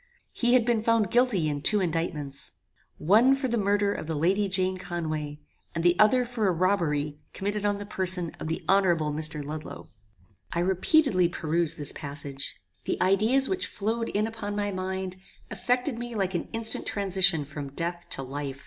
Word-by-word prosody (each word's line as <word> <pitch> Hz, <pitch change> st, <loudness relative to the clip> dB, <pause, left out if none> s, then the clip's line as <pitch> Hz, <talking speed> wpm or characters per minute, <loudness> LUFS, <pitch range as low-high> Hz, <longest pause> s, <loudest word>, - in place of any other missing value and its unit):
He 240 Hz, +1 st, +3 dB
had 245 Hz, -3 st, +4 dB
been 235 Hz, -2 st, +1 dB
found 225 Hz, -3 st, +2 dB
guilty 240 Hz, -9 st, +3 dB
in 145 Hz, -1 st, -2 dB
two 210 Hz, +7 st, +5 dB
indictments. 160 Hz, -5 st, -2 dB, 0.4 s
One 225 Hz, -, +5 dB
for 270 Hz, -1 st, -2 dB
the 235 Hz, -, 0 dB
murder 200 Hz, 0 st, +1 dB
of -, -, -6 dB
the 160 Hz, -, -2 dB
Lady 195 Hz, +7 st, +1 dB
Jane 185 Hz, 0 st, +1 dB
Conway, 155 Hz, -4 st, -4 dB, 0.3 s
and 165 Hz, -, -1 dB
the 175 Hz, 0 st, +4 dB
other 245 Hz, +4 st, +5 dB
for 235 Hz, -4 st, -1 dB
a -, -, +3 dB
robbery 160 Hz, -5 st, 0 dB
committed 205 Hz, +1 st, -1 dB
on 205 Hz, 0 st, 0 dB
the 205 Hz, -, -7 dB
person 185 Hz, -4 st, +2 dB
of -, -, -5 dB
the 160 Hz, -, -3 dB
honorable 175 Hz, -6 st, +3 dB
Mr. 150 Hz, -1 st, +1 dB
Ludloe. 155 Hz, +1 st, -8 dB, 0.6 s
"I 170 Hz, -, 0 dB
repeatedly 185 Hz, -, +3 dB
perused 165 Hz, -1 st, 0 dB
this 145 Hz, -2 st, 0 dB
passage. 140 Hz, -2 st, -5 dB, 0.3 s
The -, -, -2 dB
ideas 220 Hz, +8 st, +3 dB
which 380 Hz, -1 st, -1 dB
flowed 225 Hz, +3 st, -2 dB
in 210 Hz, +1 st, 0 dB
upon 220 Hz, -2 st, -5 dB
my 205 Hz, 0 st, -1 dB
mind, 185 Hz, 0 st, -4 dB, 0.3 s
affected 250 Hz, 0 st, -1 dB
me 240 Hz, -1 st, -5 dB
like 190 Hz, -2 st, -1 dB
an 175 Hz, -, -3 dB
instant 225 Hz, -1 st, 0 dB
transition 190 Hz, -5 st, +2 dB
from 140 Hz, 0 st, -7 dB
death 175 Hz, +3 st, -3 dB
to 135 Hz, -, -2 dB
life. 135 Hz, 0 st, -5 dB
185 Hz, 175 wpm, -27 LUFS, 155-215 Hz, 0.6 s, two